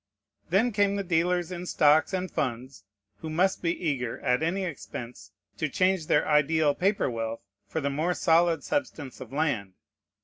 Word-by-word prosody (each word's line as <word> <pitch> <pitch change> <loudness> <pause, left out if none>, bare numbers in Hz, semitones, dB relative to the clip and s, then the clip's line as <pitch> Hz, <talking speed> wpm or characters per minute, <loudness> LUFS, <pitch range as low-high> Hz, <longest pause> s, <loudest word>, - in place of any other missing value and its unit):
Then 210 +8 +3
came 200 -1 +2
the 200 - -2
dealers 175 0 0
in 180 0 -6
stocks 150 0 +4
and 185 -2 -2
funds, 130 -6 -4 0.3
who 160 - -7
must 180 +5 +1
be 170 - +1
eager, 125 -6 -2
at 125 +1 +1
any 180 +4 0
expense, 120 - -8 0.3
to 155 - 0
change 185 +1 +1
their - - +2
ideal 150 0 +3
paper 195 +6 +1
wealth 115 -2 -4 0.2
for 160 - -3
the 140 0 -1
more 160 +5 0
solid 165 -1 +3
substance 210 - -3
of 130 -2 -9
land. 135 -10 -1
160 Hz, 165 wpm, -27 LUFS, 135-180 Hz, 0.3 s, stocks